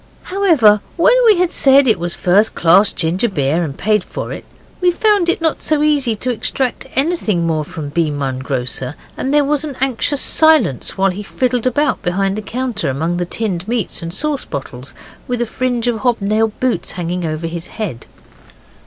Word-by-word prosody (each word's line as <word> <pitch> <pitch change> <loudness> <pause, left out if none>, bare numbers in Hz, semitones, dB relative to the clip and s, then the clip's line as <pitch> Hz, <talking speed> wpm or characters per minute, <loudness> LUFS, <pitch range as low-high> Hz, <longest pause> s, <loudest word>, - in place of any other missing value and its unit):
However, 310 - +3 0.2
when 425 +9 +5
we 425 -4 +6
had 360 -1 +1
said 275 0 +4
it 220 -6 +3
was 175 0 -2
first 200 +5 +2
class 195 +5 +5
ginger 180 +8 0
beer, 155 -1 0
and 145 -4 -5
paid 210 -1 +1
for - - -6
it, - - -9 0.4
we 360 - +4
found 400 -1 +2
it 345 - 0
not 320 -2 0
so 305 -1 0
easy 285 -7 +2
to 250 +4 -2
extract 250 +2 -2
anything 265 - +1
more 160 -2 0
from 150 0 -7
B. 165 +1 0
Munn, 140 -3 -3
grocer; 130 0 -3 0.2
and 265 - -3
there 295 0 +4
was 295 +1 0
an 285 -4 -6
anxious 270 +2 +1
silence 315 - +3
while 195 0 +2
he 190 +3 -6
fiddled 250 +3 -1
about 285 +3 0
behind 195 +2 0
the 215 - -4
counter 240 - -3
among 160 +6 -2
the 175 -1 -2
tinned 195 -3 -3
meats 230 -4 -2
and 165 0 -5
sauce 285 - 0
bottles, 135 -1 -7 0.3
with 245 -1 -2
a 240 - 0
fringe 245 +1 -2
of 240 -2 0
hobnailed 215 -1 0
boots 255 -2 -1
hanging 175 0 -3
over 155 0 -3
his 165 +1 -5
head. 165 - -6
215 Hz, 190 wpm, -17 LUFS, 170-270 Hz, 0.4 s, we